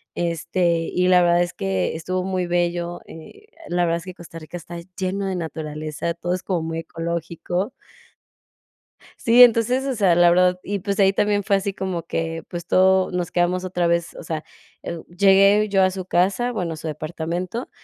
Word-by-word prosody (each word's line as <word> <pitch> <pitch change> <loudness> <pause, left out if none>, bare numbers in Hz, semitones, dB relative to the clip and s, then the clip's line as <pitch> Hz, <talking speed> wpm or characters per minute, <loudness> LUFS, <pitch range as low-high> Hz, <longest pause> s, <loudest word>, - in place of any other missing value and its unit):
este, 170 0 0
y 180 0 +2
la 180 -1 +6
verdad 175 0 +4
es 175 - -1
que 95 - -1
estuvo 180 +3 -2
muy 185 -2 -1
bello, 175 0 -1
eh, 415 - -13 0.2
la 175 0 +1
verdad 170 0 +1
es - - -12
que 185 - -7
Costa 170 -1 -12
Rica 155 +2 -8
está 170 0 -9 0.2
lleno 190 +1 -2
de 190 - -2
naturaleza, 155 0 -4
todo 175 +1 -3
es 185 - -4
como 180 -4 -1
muy 165 0 -3
ecológico. 170 +4 -3 1.5
Sí, 235 +2 +6
entonces, 245 +2 +4
o 270 -2 -2
sea, 195 -5 +4
la 175 0 +5
verdad 180 +1 +3
y, 200 0 -3
pues, 200 +1 -2
ahí 195 0 +5
también 205 0 +1
fue 200 +1 +2
así 195 0 -2
como 185 -3 -3
que, 165 0 -3
pues, 175 -1 -7
todo, 190 0 +4
nos 180 -1 -3
quedamos 180 +1 +1
otra 180 -2 0
vez, 170 0 0
o - - -9
sea, 160 -1 -4 0.4
eh, 170 - -4
uh, 165 - -10
llegué 195 +3 +5
yo 195 -1 +3
a 185 - +4
su 185 0 -6
casa, 190 +7 +1
bueno, 180 -7 -3
a - - -8
su 160 - -8
departamento, 170 - -4
175 Hz, 195 wpm, -22 LUFS, 170-190 Hz, 1.5 s, la